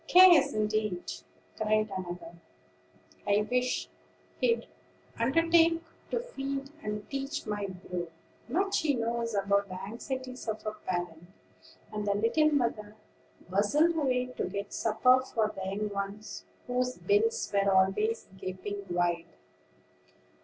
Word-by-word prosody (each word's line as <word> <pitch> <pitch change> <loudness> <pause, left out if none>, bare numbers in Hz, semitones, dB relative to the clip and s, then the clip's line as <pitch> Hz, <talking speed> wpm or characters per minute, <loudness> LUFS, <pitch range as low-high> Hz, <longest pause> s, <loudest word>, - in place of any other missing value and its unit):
"Cares 350 -6 +8
indeed!" 215 -3 0 0.5
cried 215 -1 +1
another; 175 -2 -6 0.9
"I 205 +1 +3
wish 250 0 +1 0.5
he'd 465 -1 +2 0.5
undertake 330 +6 +4 0.3
to - - 0
feed 275 - -4
and 210 -2 -4
teach 275 +1 -3
my 205 -2 -2
brood. 180 -2 -5 0.4
Much 390 +8 +1
he 295 -3 +2
knows 230 -1 -1
about 200 0 +2
the 185 0 -6
anxieties 255 +5 -6
of 215 -1 -3
a 215 - 0
parent." 175 -5 -4 0.7
And 210 -1 -3
the 200 - +2
little 230 +9 +3
mother 220 -6 0 0.5
bustled 285 - +3
away 255 -5 +1
to - - 0
get 200 +1 -5
supper 250 +4 +4
for 220 -4 -1
the 190 0 -3
young 210 +2 -2
ones, 200 +1 -5 0.2
whose 250 0 -1
bills 450 - +1
were 200 0 +3
always 195 +4 +2
gaping 195 +2 -5
wide. 175 -1 0
215 Hz, 125 wpm, -30 LUFS, 200-270 Hz, 0.9 s, Cares